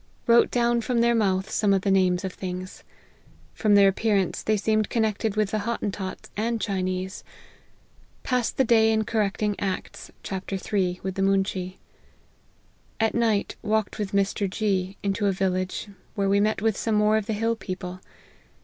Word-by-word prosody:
Wrote 235 0 +5
down 235 -1 +2
from 235 +1 0
their 235 0 +4
mouth 195 -4 +1
some 205 -2 +2
of 190 - -1
the 195 - +2
names 185 -1 +2
of 185 - -4
things. 185 0 -6 0.7
From 210 -2 +3
their 200 -1 +7
appearance, 195 -1 +1
they 215 0 +1
seemed 215 0 +1
connected 220 -2 0
with 215 -2 +1
the 215 - 0
Hottentots 200 -3 -4
and 230 +2 -1
Chinese. 185 -1 -3 1.0
Passed 250 -3 -1
the 265 - +4
day 225 -2 +4
in 220 0 +2
correcting 210 -1 0
Acts, 190 -2 -4
chapter 195 0 -4 0.2
iii. 180 -2 +1
with 190 0 -2
the 195 - -3
moonshee. 195 -1 0 1.2
At 225 0 +2
night 225 -4 0
walked 215 0 -1
with 205 -2 -2
Mr. 200 0 0
G, 195 -1 -1
into 200 +1 0
a - - +3
village, 185 +1 -1 0.3
where 200 -1 0
we 200 +1 +3
met 215 0 +1
with 220 -2 +2
some 225 +1 -1
more 210 +1 +4
of 215 -1 -3
the 220 - -1
hill 225 +2 0
people. 185 -3 -6
200 Hz, 165 wpm, -25 LUFS, 190-220 Hz, 1.2 s, their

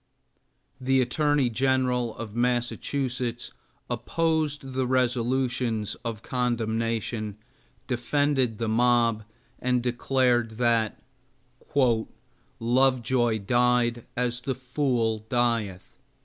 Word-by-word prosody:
The 130 +1 +2
Attorney 140 +1 +2
General 125 -1 +1
of 110 -2 -7
Massachusetts 120 0 -1 0.4
opposed 155 -5 -1
the 130 -1 0
resolutions 125 -3 0
of 115 -2 -5
condemnation, 115 -3 -1 0.5
defended 130 -1 0
the 115 - -2
mob, 115 -1 +2 0.3
and 125 -1 +1
declared 120 -2 +1
that 115 -3 +1 1.6
"Lovejoy 120 -1 +2
died 120 0 +2
as 125 0 -1
the 130 +1 -2
fool 125 -4 0
dieth." 115 -6 -1
120 Hz, 80 wpm, -26 LUFS, 115-130 Hz, 1.6 s, The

